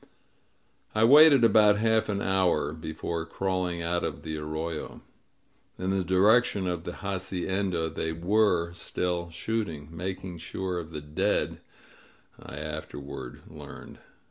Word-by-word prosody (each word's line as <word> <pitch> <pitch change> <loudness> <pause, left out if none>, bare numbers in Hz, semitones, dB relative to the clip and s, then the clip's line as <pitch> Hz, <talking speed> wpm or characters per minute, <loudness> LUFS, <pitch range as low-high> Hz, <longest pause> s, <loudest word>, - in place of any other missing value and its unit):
I 110 - +3
waited 145 +1 +8
about 105 -2 +6
half 110 0 +2
an 100 -1 -1
hour 95 -5 +1
before 80 +1 -4
crawling 90 -1 -2
out 85 +1 0
of 75 - -4
the 80 -1 -4
arroyo. 80 +1 -5 0.8
In 95 +1 -2
the 95 -1 +1
direction 100 +3 +3
of 90 -2 -3
the 90 - -4
hacienda 95 -2 -1
they 80 0 -3
nf^re 85 0 +1
still 85 0 -2
shooting— 85 -5 -3
^making 90 +1 -5
sure 90 +2 -3
of 80 -2 -7
the 75 -2 -6
dead, 75 +1 -1 0.8
I 70 - -9
afterward 75 -4 -7
learned. - - -11
90 Hz, 125 wpm, -28 LUFS, 80-95 Hz, 0.8 s, waited